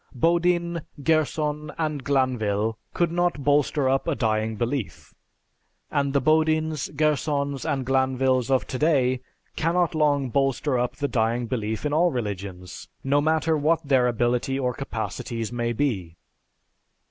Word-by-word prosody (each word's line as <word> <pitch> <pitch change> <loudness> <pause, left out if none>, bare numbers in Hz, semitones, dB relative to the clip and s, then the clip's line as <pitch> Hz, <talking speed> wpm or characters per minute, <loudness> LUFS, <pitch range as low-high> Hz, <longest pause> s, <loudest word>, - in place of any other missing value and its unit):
Bodin, 170 +3 +1 0.2
Gerson, 150 -1 0
and 155 -4 -2
Glanvil 115 -6 0 0.2
could 170 -2 0
not 175 -4 0
bolster 145 0 +2
up 135 +1 +1
a 165 - +1
dying 110 -2 0
belief; 120 +1 -4 0.8
and 140 -2 +1
the 140 - +4
Bodins, 155 +1 +1
Gersons, 145 -2 0
and 135 -2 -2
Glanvils 130 -1 +1
of 130 -6 +2
today 130 -3 +1 0.3
cannot 170 +1 +1
long 145 -4 +1
bolster 135 0 +1
up 125 +2 -1
the 145 +2 -1
dying 120 -1 0
belief 110 -1 -3
in 150 - 0
all 170 +3 +4
religions... 100 - -5 0.2
no 140 +2 +2
matter 160 +1 +2
what 155 +1 +1
their 130 -3 +4
ability 120 +2 0
or 125 -2 0
capacities 115 -3 -4
may 120 -1 -1
be. 105 - -2
135 Hz, 135 wpm, -25 LUFS, 120-155 Hz, 0.8 s, the